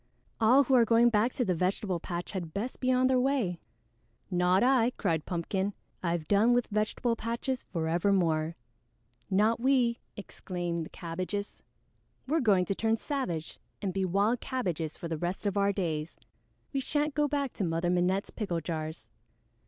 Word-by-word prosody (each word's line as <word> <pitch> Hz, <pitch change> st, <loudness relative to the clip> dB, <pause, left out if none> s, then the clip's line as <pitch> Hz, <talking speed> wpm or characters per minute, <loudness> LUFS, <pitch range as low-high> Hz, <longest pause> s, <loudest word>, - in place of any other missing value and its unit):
All 250 Hz, +5 st, +6 dB
who 270 Hz, -, 0 dB
are 245 Hz, -2 st, +7 dB
going 230 Hz, +1 st, +4 dB
back 220 Hz, +3 st, +2 dB
to 250 Hz, -, 0 dB
the 185 Hz, -, +1 dB
vegetable 180 Hz, +1 st, -1 dB
patch 175 Hz, +1 st, -5 dB
had 175 Hz, -5 st, -5 dB
best 225 Hz, +6 st, -3 dB
be 255 Hz, 0 st, +1 dB
on 255 Hz, 0 st, +3 dB
their 260 Hz, 0 st, +4 dB
way." 250 Hz, -10 st, 0 dB, 0.7 s
"Not 180 Hz, +2 st, +3 dB
I!" 250 Hz, -2 st, +4 dB
cried 165 Hz, -6 st, -1 dB
Pumpkin. 190 Hz, +3 st, -2 dB, 0.3 s
"I've 170 Hz, -3 st, -1 dB
done 215 Hz, +4 st, +4 dB
with 245 Hz, 0 st, +2 dB
vegetable 215 Hz, +3 st, 0 dB
patches 235 Hz, +3 st, -3 dB
forevermore." 165 Hz, -1 st, 0 dB, 0.7 s
"Not 215 Hz, +4 st, +3 dB
we," 250 Hz, -2 st, +2 dB, 0.2 s
exclaimed 175 Hz, -4 st, -4 dB
the -, -, -18 dB
Cabbages. 185 Hz, +4 st, -5 dB, 0.7 s
"We're 315 Hz, +4 st, +2 dB
going 200 Hz, -9 st, +3 dB
to 195 Hz, -, -1 dB
turn 225 Hz, +3 st, +1 dB
savage 215 Hz, -, -3 dB, 0.2 s
and 195 Hz, -3 st, -2 dB
be 195 Hz, -, 0 dB
wild 200 Hz, +6 st, +1 dB
cabbages 175 Hz, -, -3 dB
for 170 Hz, -, -5 dB
the 160 Hz, -2 st, -3 dB
rest 175 Hz, +5 st, -3 dB
of 200 Hz, -1 st, 0 dB
our 200 Hz, 0 st, +3 dB
days! 165 Hz, -5 st, -3 dB, 0.5 s
We 275 Hz, -, +1 dB
shan't 295 Hz, +2 st, 0 dB
go 295 Hz, 0 st, +2 dB
back 280 Hz, -3 st, -1 dB
to -, -, -3 dB
Mother 170 Hz, 0 st, 0 dB
Minette's 180 Hz, +2 st, +1 dB
pickle 185 Hz, -7 st, -2 dB
jars." 160 Hz, -1 st, -5 dB
200 Hz, 165 wpm, -30 LUFS, 175-240 Hz, 0.7 s, are